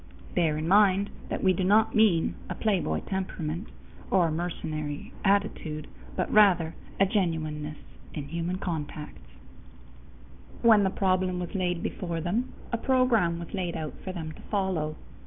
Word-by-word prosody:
Bear 160 Hz, -3 st, +2 dB
in 155 Hz, +1 st, -2 dB
mind 200 Hz, +1 st, +4 dB, 0.2 s
that -, -, -3 dB
we 190 Hz, -1 st, +5 dB
do 185 Hz, -, -1 dB
not 210 Hz, +4 st, +4 dB
mean 210 Hz, -7 st, +4 dB, 0.2 s
a -, -, -3 dB
playboy 180 Hz, -, 0 dB
temperament 185 Hz, -1 st, -3 dB, 0.4 s
or 180 Hz, -3 st, +4 dB
a -, -, -2 dB
mercenary 155 Hz, -3 st, -4 dB
attitude, 195 Hz, -7 st, 0 dB, 0.3 s
but -, -, -1 dB
rather 180 Hz, -6 st, +5 dB, 0.3 s
a 195 Hz, -, +6 dB
genuineness 155 Hz, -6 st, -1 dB, 0.4 s
in 145 Hz, -3 st, -4 dB
human 170 Hz, +3 st, -2 dB
contacts. 150 Hz, -, -6 dB, 1.3 s
When 225 Hz, -3 st, +7 dB
the 190 Hz, -, +3 dB
problem 185 Hz, -1 st, +1 dB
was 175 Hz, -, -5 dB
laid 180 Hz, -3 st, -1 dB
before 170 Hz, -3 st, -3 dB
them, 200 Hz, +10 st, -1 dB, 0.2 s
a 235 Hz, -, +1 dB
program 240 Hz, -10 st, +3 dB
was 170 Hz, -1 st, -8 dB
laid 180 Hz, -4 st, -2 dB
out 155 Hz, -2 st, -4 dB
for 190 Hz, -, -4 dB
them 160 Hz, -4 st, -5 dB
to -, -, -12 dB
follow. 185 Hz, -7 st, 0 dB
180 Hz, 150 wpm, -28 LUFS, 160-195 Hz, 1.3 s, When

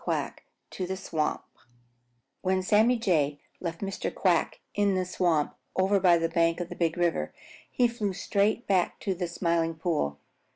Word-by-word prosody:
QUACK -, -, -2 dB, 0.3 s
TO 185 Hz, -, -4 dB
THE 190 Hz, +1 st, -3 dB
SWAMP 160 Hz, -5 st, -2 dB, 1.0 s
When 185 Hz, 0 st, +1 dB
Sammy 220 Hz, +5 st, +4 dB
Jay 150 Hz, -10 st, +1 dB, 0.2 s
left 170 Hz, -2 st, -5 dB
Mr. 195 Hz, -1 st, -3 dB
Quack 175 Hz, -4 st, +1 dB
in 205 Hz, -1 st, +2 dB
the 185 Hz, 0 st, 0 dB
swamp 175 Hz, -4 st, +1 dB, 0.2 s
over 195 Hz, +2 st, +3 dB
by 180 Hz, -2 st, +5 dB
the 165 Hz, 0 st, +1 dB
bank 165 Hz, 0 st, +2 dB
of 175 Hz, -1 st, -4 dB
the -, -, -7 dB
Big 165 Hz, 0 st, 0 dB
River, 170 Hz, -, 0 dB, 0.4 s
he 245 Hz, -, +3 dB
flew 230 Hz, -4 st, -2 dB
straight 205 Hz, +4 st, 0 dB
back 185 Hz, -3 st, +1 dB
to 195 Hz, -, 0 dB
the 180 Hz, -1 st, -3 dB
Smiling 170 Hz, -1 st, 0 dB
Pool. 155 Hz, -, -1 dB
180 Hz, 165 wpm, -28 LUFS, 165-195 Hz, 1.0 s, by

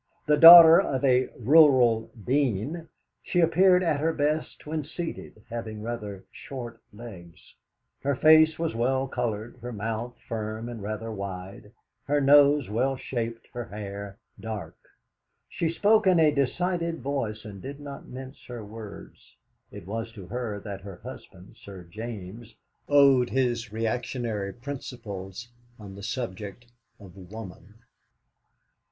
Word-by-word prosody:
The 150 Hz, -2 st, +4 dB
daughter 165 Hz, +1 st, +11 dB
of 135 Hz, 0 st, -2 dB
a 130 Hz, -1 st, +3 dB
Rural 125 Hz, -4 st, +5 dB, 0.2 s
Dean, 140 Hz, -, -1 dB, 0.3 s
she 175 Hz, -, -1 dB
appeared 180 Hz, +2 st, +4 dB
at 155 Hz, -5 st, +1 dB
her 160 Hz, +2 st, +1 dB
best 150 Hz, +1 st, -2 dB
when 155 Hz, 0 st, -3 dB
seated, 160 Hz, -8 st, -7 dB
having 110 Hz, -2 st, -6 dB
rather 105 Hz, -4 st, -6 dB
short 120 Hz, -4 st, -9 dB
legs. 100 Hz, -7 st, -13 dB, 0.5 s
Her 140 Hz, 0 st, 0 dB
face 155 Hz, +3 st, +5 dB
was 165 Hz, -1 st, -2 dB
well 130 Hz, +3 st, 0 dB
coloured, 120 Hz, -3 st, -4 dB
her 120 Hz, +1 st, -6 dB
mouth, 115 Hz, +3 st, -4 dB
firm 110 Hz, 0 st, -4 dB
and 115 Hz, -3 st, -7 dB
rather 110 Hz, +2 st, -5 dB
wide, 100 Hz, 0 st, -7 dB, 0.3 s
her 145 Hz, +1 st, +1 dB
nose 145 Hz, 0 st, +5 dB
well 125 Hz, +6 st, 0 dB
shaped, 115 Hz, -3 st, -5 dB
her 120 Hz, -1 st, -5 dB
hair 100 Hz, -1 st, -8 dB, 0.2 s
dark. 110 Hz, -3 st, -6 dB, 0.7 s
She 165 Hz, -, -2 dB
spoke 210 Hz, +5 st, +3 dB
in 180 Hz, -3 st, +5 dB
a 155 Hz, -2 st, +4 dB
decided 170 Hz, +4 st, -1 dB
voice, 120 Hz, -6 st, -3 dB
and 100 Hz, -3 st, -9 dB
did 140 Hz, +5 st, -8 dB
not 140 Hz, -1 st, -9 dB
mince 130 Hz, +2 st, -10 dB
her 120 Hz, -3 st, -7 dB
words. 105 Hz, -, -12 dB, 0.4 s
It -, -, -10 dB
was 115 Hz, +3 st, -5 dB
to 100 Hz, -5 st, -10 dB
her 110 Hz, 0 st, -4 dB
that 100 Hz, -2 st, -7 dB
her 100 Hz, -1 st, -9 dB
husband, 95 Hz, -7 st, -12 dB
Sir 95 Hz, -3 st, -10 dB
James, 110 Hz, +3 st, -9 dB, 0.3 s
owed 140 Hz, -3 st, +5 dB
his 120 Hz, -4 st, -1 dB
reactionary 115 Hz, -2 st, -3 dB
principles 120 Hz, -5 st, -8 dB, 0.3 s
on 100 Hz, -3 st, -11 dB
the 100 Hz, -, -10 dB
subject 110 Hz, -1 st, -5 dB, 0.3 s
of 95 Hz, -4 st, -14 dB
woman. 100 Hz, +1 st, -11 dB
120 Hz, 135 wpm, -26 LUFS, 105-140 Hz, 0.7 s, daughter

